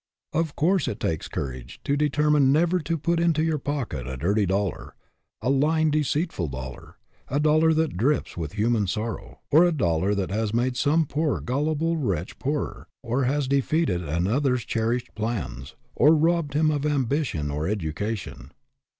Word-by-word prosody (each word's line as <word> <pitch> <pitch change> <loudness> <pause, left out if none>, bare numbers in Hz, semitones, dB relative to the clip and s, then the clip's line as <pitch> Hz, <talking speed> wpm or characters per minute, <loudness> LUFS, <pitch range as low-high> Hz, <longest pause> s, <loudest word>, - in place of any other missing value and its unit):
Of 160 -1 -1
course 175 +1 +2
it 105 - -3
takes 80 -2 -2
courage 65 -2 -6
to 140 - +1
determine 150 -1 +3
never 170 +5 +3
to 165 +1 -2
put 170 +3 0
into 165 -2 +2
your 160 -2 0
pocket 130 - -3
a 65 0 -5
dirty 100 +8 +1
dollar, 95 0 -2 0.5
a 125 - +2
lying, 155 +3 +2
deceitful 150 - 0
dollar, 65 -2 -8 0.3
a 140 - 0
dollar 155 +2 +4
that 160 - 0
drips 135 +7 0
with 80 -1 -5
human 110 -1 +1
sorrow, 110 +4 -4
or 155 +4 +7
a 175 - +4
dollar 95 - +1
that 95 -2 -2
has 110 +1 -1
made 125 +2 +1
some 155 +5 +2
poor 150 +1 -1
gullible 155 +5 0
wretch 95 - -2
poorer, 145 +2 -3 0.2
or 125 +3 0
has 140 +1 0
defeated 140 - +1
another's 110 - 0
cherished 115 +2 -1
plans, 85 - -4 0.2
or 155 +2 +5
robbed 160 -2 +1
him 155 0 +3
of 145 -2 -1
ambition 135 - 0
or 75 +2 -2
education. 95 - -4
130 Hz, 160 wpm, -25 LUFS, 100-150 Hz, 0.5 s, or